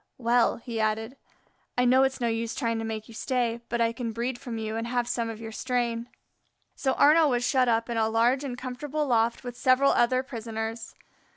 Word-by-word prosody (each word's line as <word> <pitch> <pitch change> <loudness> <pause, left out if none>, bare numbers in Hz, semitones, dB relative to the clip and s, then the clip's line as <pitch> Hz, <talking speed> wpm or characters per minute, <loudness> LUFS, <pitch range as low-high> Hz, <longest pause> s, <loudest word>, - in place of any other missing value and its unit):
"Well," 240 -1 +2
he 230 -1 -5
added, 220 +3 -1 0.6
"I 250 - +3
know 255 +2 +5
it's 265 0 +1
no 240 - 0
use 230 0 -2
trying 230 -4 -1
to - - -3
make 220 -1 -5
you 230 - -12
stay, 235 0 -1
but 235 - -1
I 230 0 +2
can 230 -2 -4
breed 240 +2 -3
from 235 -3 -6
you 220 0 -3
and 230 +1 -3
have 240 0 -1
some 240 -2 -1
of 225 -1 -7
your 225 -1 -7
strain." 240 0 -2 0.7
So 265 -2 0
Arnaux 305 +1 +5
was 245 -2 +1
shut 255 -3 +3
up 230 0 +1
in 235 -1 -3
a 220 0 +2
large 240 +5 +2
and 255 -3 -4
comfortable 275 +4 -3
loft 235 -2 +1
with 245 -1 -6
several 260 +2 +4
other 255 +2 +2
prisoners. 225 -2 -5
235 Hz, 210 wpm, -27 LUFS, 225-255 Hz, 0.7 s, know